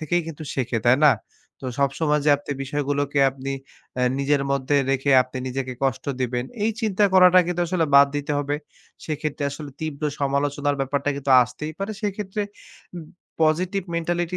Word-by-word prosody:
থেকেই 170 +3 0
কিন্তু 160 -1 -8
শেখে, 125 -3 -1
তাই 125 +3 +5
না? 145 - +7 0.5
তো 130 - -6
সব 140 -1 +3
সময় 150 -2 +2
যে - - +6
আপনি 145 - -5
বিষয়গুলোকে 145 0 -1
আপনি 135 +1 -5 0.4
অ্যা 125 - +1
নিজের 140 0 +1
মধ্যে 140 +1 +1
রেখে 135 +1 +1
আপনি 130 +1 -8
নিজেকে 130 0 -3
কষ্ট 130 0 -1 0.2
দিবেন 125 0 -1 0.2
এই 225 - +2
চিন্তা 210 -2 +2
করাটা 185 0 +7
কিন্তু 175 0 -2
আসলে 170 -3 +1
বাদ 140 0 +8
দিতে 145 +1 -2
হবে। 145 0 -1 0.5
সেক্ষেত্রে 155 -1 -3
আসলে 145 0 -8
তীব্র 155 -1 -4 0.2
সমালোচনার 145 +1 0
ব্যাপারটা 140 +1 -1
কিন্তু 140 -1 -3
আসতেই 140 +6 -6
পারে। 200 +2 -3
সেক্ষেত্রে 205 0 -2 0.5
উম 165 - -7 0.4
positive 180 +5 +1
mentality 175 +1 -1
145 Hz, 165 wpm, -23 LUFS, 135-170 Hz, 0.5 s, বাদ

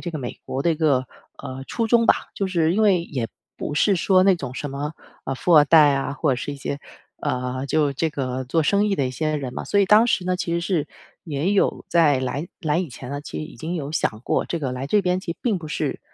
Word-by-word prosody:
这 175 - -4
个 160 - -5
美 125 -3 -6
国 135 +1 -2
的 170 - +2
一 - - -1
个 145 -5 +2 0.4
呃 130 +1 -6
初 230 - -1
衷 230 +1 +4
吧， - - +7 0.2
就 195 - -1
是 170 -3 +1
因 220 - +2
为 190 -5 +4
也 130 -8 -3 0.3
不 145 - -4
是 195 +6 +3
说 185 +2 +4
那 195 -2 +5
种 130 -6 -6
什 145 +2 -4
么 145 +2 -4 0.3
呃 135 - -2
富 175 +6 +2
二 150 - +8
代 150 -1 +6
啊， 135 0 -2
或 145 +1 0
者 - - -1
是 145 - -4
一 140 - -7
些 140 +1 -4 0.4
呃， 125 +1 -2
就 145 0 +1
这 160 +4 0
个 130 -3 -3
做 160 +6 +1
生 200 +6 +2
意 205 - +1
的 135 - +1
一 - - -3
些 155 +4 -1
人 135 -4 -4
嘛。 - - -4
所 205 - +1
以 200 - +5
当 215 +4 +6
时 190 - +1
呢， 185 0 +1
其 175 -2 -3
实 170 - 0
是 170 -4 -1 0.4
也 155 +4 -1
有 200 - +1
在 155 -6 +4
来 140 +5 -3
来 155 -3 +1
以 180 -2 -2
前 125 0 -9
呢， 145 0 -4
其 - - -7
实 - - -4
已 155 - -12
经 165 +3 -4
有 150 -3 -4
想 110 -8 -1
过， - - +1
这 170 - -2
个 135 -5 -3
来 130 +2 -4
这 210 +8 +3
边 180 0 +1
其 170 - -4
实 - - -24
并 220 -6 +1
不 165 - -8
是 - - -2
155 Hz, 290 characters per minute, -23 LUFS, 135-180 Hz, 0.4 s, 二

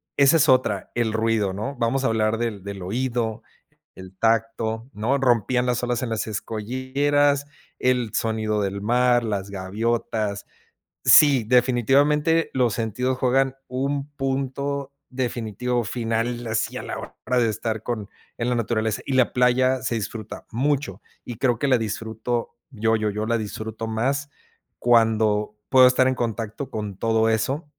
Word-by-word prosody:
esa 140 +3 +5
es 155 0 +3
otra, 105 -7 +2
el 115 -2 +1
ruido, 110 -3 +1
¿no? 135 +8 -4
Vamos 125 +3 0
a - - +2
hablar 110 0 +1
del 110 -5 -3
del 100 -1 -7
oído, 115 +1 -2 0.5
del 95 0 -12
tacto, 115 0 0
¿no? 120 +7 0
Rompían 125 -1 +2
las 125 0 0
olas 120 0 -1
en 120 - -2
las 110 -1 -2
escolleras, 135 +7 0 0.3
el 125 -3 +1
sonido 110 -2 0
del 100 0 -2
mar, 120 +2 +3
las 100 -3 -3
gaviotas. 105 +1 -2 0.6
Sí, 140 -6 +7
definitivamente 140 +7 +3
los 125 -5 +2
sentidos 125 +3 -1
juegan 135 +1 +2
un 140 +2 -2
punto 140 +1 -2 0.2
definitivo 120 -1 -2
final 115 +1 -2
así 110 0 -1
a - - -4
la - - -5
hora 125 - -4
de 115 -2 +2
estar 110 0 -3
con 110 -4 -4 0.3
en 120 +1 -1
la 125 - +1
naturaleza 110 -2 -1
y 135 - -2
la 130 -2 +3
playa 130 +1 +3
se 120 - -1
disfruta 110 0 -6
mucho 140 +4 -1 0.2
y 120 -3 -7
creo 125 -4 +1
que 145 - 0
la 130 - +5
disfruto, 115 +2 -3 0.2
yo, 110 -1 +1
yo, 110 -1 -1
yo 105 +1 -3
la 115 +1 +1
disfruto 110 +1 -5
más 135 +6 -1 0.5
cuando 110 -3 +2
puedo 130 -1 +7
estar 130 0 +3
en 130 - +1
contacto 115 +2 -3
con 105 -3 -5
todo 115 +1 +2
eso. 130 +8 0
115 Hz, 155 wpm, -23 LUFS, 110-130 Hz, 0.6 s, Sí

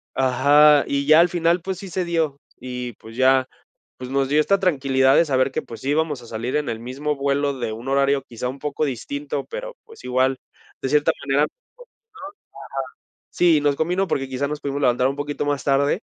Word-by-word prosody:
ajá, 145 +3 +5
y 140 0 -1
ya 155 +1 +7
al 175 - +3
final, 170 0 +1
pues 190 0 -4
sí 195 - -8
se 185 +1 -2
dio, 160 -5 -1 0.2
y 125 -1 -5
pues 110 +2 -14
ya, 130 0 +4 0.5
pues 125 0 -7
nos 135 0 0
dio 150 +2 +3
esta 195 +6 +2
tranquilidad 135 -6 +3
de 170 - +5
saber 130 -2 +1
que, - - -2
pues 115 -2 -10
sí 135 - -4
íbamos 150 -3 0
a - - -12
salir 115 +4 -3
en 150 - -1
el 115 0 -5
mismo 140 +5 -3
vuelo 140 0 0
de 110 -3 -3
un 115 +4 -8
horario 140 0 +2
quizá 120 +1 -5
un 135 +2 -6
poco 150 +1 -2
distinto, 140 +2 -4
pero - - -6
pues 450 - -15
igual, 130 +1 +1 0.5
de - - -1
cierta 150 0 +3
manera, 140 +1 +2
nos - - -3
contestó, - - -53 1.5
ajá, - - -
sí, 165 -4 +3
nos 145 -1 +2
combino, 180 +4 0
porque 135 -4 -1
quizás 135 +2 -2
nos 150 0 -4
pudimos 140 0 -3
levantar 125 0 +3
un 135 - -2
poquito 145 0 -3
más 145 -2 -1
tarde, 140 +6 +2
140 Hz, 210 wpm, -22 LUFS, 130-150 Hz, 1.5 s, ya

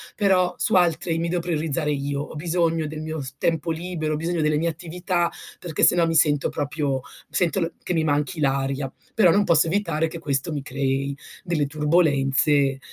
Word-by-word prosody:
però 185 -3 +2
su - - +1
altre 170 -2 +2
mi 165 +1 -1
devo 175 0 -1
priorizzare 160 -3 -1
io. 140 0 -2
Ho 150 - -8
bisogno 165 0 0
del 155 +1 -6
mio 155 0 -5
s 135 -1 -6
tempo 165 0 0
libero, 160 -2 -3
ho - - 0
bisogno 165 +2 -2
delle 150 -1 +1
mie 165 +3 0
attività, 175 +1 -2 0.3
perché 165 -4 -5
se - - +8
no 170 -1 +3
mi 165 - -1
sento 150 -3 +3
proprio 145 -1 -2
mi - - -13 0.3
sento 180 +2 +2
l 165 - -2
che - - -3
mi 160 - +1
manchi 150 +1 -1
l'aria. 135 -1 -1 0.2
Però 190 -7 +5
non 205 +4 +3
posso 170 -5 +5
evitare 165 -3 0
che 165 +1 -8
questo 140 -1 0
mi 145 - -3
crei 135 +1 -2 0.3
delle 170 -5 -1
turbolenze, 145 -2 +2
160 Hz, 195 wpm, -23 LUFS, 145-170 Hz, 0.3 s, se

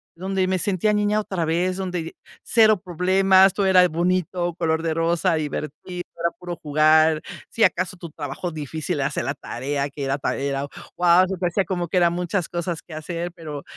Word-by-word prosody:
donde 190 +2 -1
me 185 0 0
sentía 205 +2 +1
niña 210 0 +1
otra 190 -5 -2
vez, 175 +3 0
donde 180 -4 -4 0.3
cero 215 -3 +4
problemas, 190 +1 +4
todo 200 0 0
era 185 -1 +6
bonito, 175 +1 0
color 160 -1 0
de 165 -1 0
rosa, 165 +1 +1
divertido, 155 +4 -5 0.2
era 170 0 +1
puro 175 -1 -5
jugar. 155 +1 +3 0.3
Si 230 - 0
acaso, 185 0 +1
tu 170 -1 -8
trabajo 150 +4 -5
difícil, 155 -1 -4
era - - +1
hacer - - -3
la - - -1
tarea, 140 +3 -3
que 140 0 -7
era 135 +1 0
para 140 - -2
ir 140 0 -1
a 140 +1 -3 0.3
guau. 175 +1 +5
Se 190 - -3
te 180 - 0
hacía, 185 +3 0
como 175 -1 -2
que 185 - 0
eran 170 -1 +4
muchas 180 0 -2
cosas 175 -1 -3
que 170 - -13
hacer. 170 +2 -4
Pero 150 -4 -7
175 Hz, 195 wpm, -23 LUFS, 155-185 Hz, 0.3 s, era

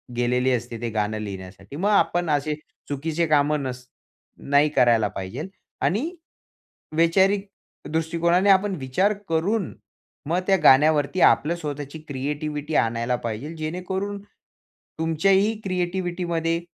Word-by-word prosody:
गेलेली 125 +2 +1
असते, 120 -1 -2
ते 120 - -2
गाणं 110 0 -1
लिहिण्यासाठी. 100 +2 -8
मग 190 +7 0
आपण 175 -4 +2
असे 150 +1 +1 0.4
चुकीचे 155 +4 -1
कामं 150 -1 +2
नस 125 -1 -5 0.7
नाही 145 +2 +5
करायला 120 -6 +3
पाहिजे 95 -1 -6
पाहिजेल 180 - -6 0.4
आणि 255 - 0 0.9
वैचारिक 190 +4 +3 0.4
दृष्टिकोनाने 170 +4 +1
आपण 195 0 +4
विचार 140 +11 +1 0.2
करून, 185 +5 0 0.6
मग 175 +2 +2
त्या 195 -1 +5
गाण्यावरती 150 +4 +5
आपलं 165 +4 0
स्वतःची 145 -2 -6
क्रिएटिव्हिटी 150 +2 -3
आणायला 115 +2 +1
पाहिजेल 115 +9 -4
जेणेकरून 190 +5 -4 0.8
तुमच्याही 190 +6 +2
क्रिएटिव्हिटीमध्ये 175 -2 -1
155 Hz, 115 wpm, -24 LUFS, 130-180 Hz, 0.9 s, नाही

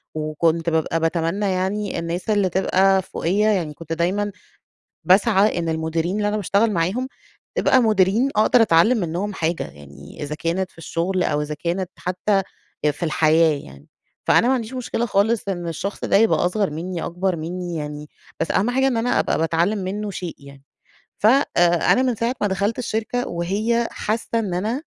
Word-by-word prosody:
وكنت 160 +2 0
بابقى 160 0 0
باتمنى 165 +4 0
يعني 195 +1 -2
الناس 170 +5 -4
اللي 205 -3 +2
تبقى 190 +1 +3
فوقيّا 200 +4 0
يعني 170 -7 -1
كنت 165 +1 -6
دايمًا 195 +5 0 0.7
باسعى 200 0 +4
إن 165 -1 -2
المديرين 160 +3 -1
اللي 205 -1 0
أنا 210 +1 0
باشتغل 205 +3 +2
معاهم، 195 +9 0 0.5
تبقى 260 - +4
مديرين 215 +3 +3
أقدر 220 +3 +4
أتعلّم 215 +5 +4
منهم 185 +2 -2
حاجة، 165 -1 -1
يعني 70 - -11
إذا 145 +1 -4
كانت 175 +4 -2
في - - -29
الشغل 175 +3 -1
أو 150 - 0
إذا 150 0 -4
كانت 175 +3 -2
حتّى 185 +2 0 0.4
آآ، 150 - +4
في 160 - -7
الحياة 155 -1 +3
يعني. 70 +1 -15 0.4
فأنا 235 - +5
ما 260 - +3
عنديش 230 0 -5
مشكلة 245 -2 -2
خالص 215 +1 +1
إن 175 -2 -3
الشخص 195 +5 -4
ده - - +2
يبقى 220 -4 +3
أصغر 200 +1 0
مني، 170 +2 -4
أكبر 180 +1 -1
مني 175 +2 -5
يعني، 150 -1 -6 0.3
بس - - -1
أهم 205 +5 +1
حاجة 265 +1 +2
إن 245 - 0
أنا 240 +2 +1
أبقى - - +1
باتعلم 170 +6 +1
منه 205 +2 -3
شيء 180 -2 -6
يعني. 140 -1 -14 0.6
ف 210 - +2
آآ، 270 +5 +6 0.5
أنا 255 - +3
من 250 -2 +1
ساعة 230 +3 -1
ما 205 - +2
دخلت 200 +3 -1
الشركة 240 +1 -2
وهي 210 +7 0
حاسّة 230 +1 -2
إن 195 -5 -3
أنا 220 - -2
185 Hz, 175 wpm, -22 LUFS, 165-215 Hz, 0.7 s, آآ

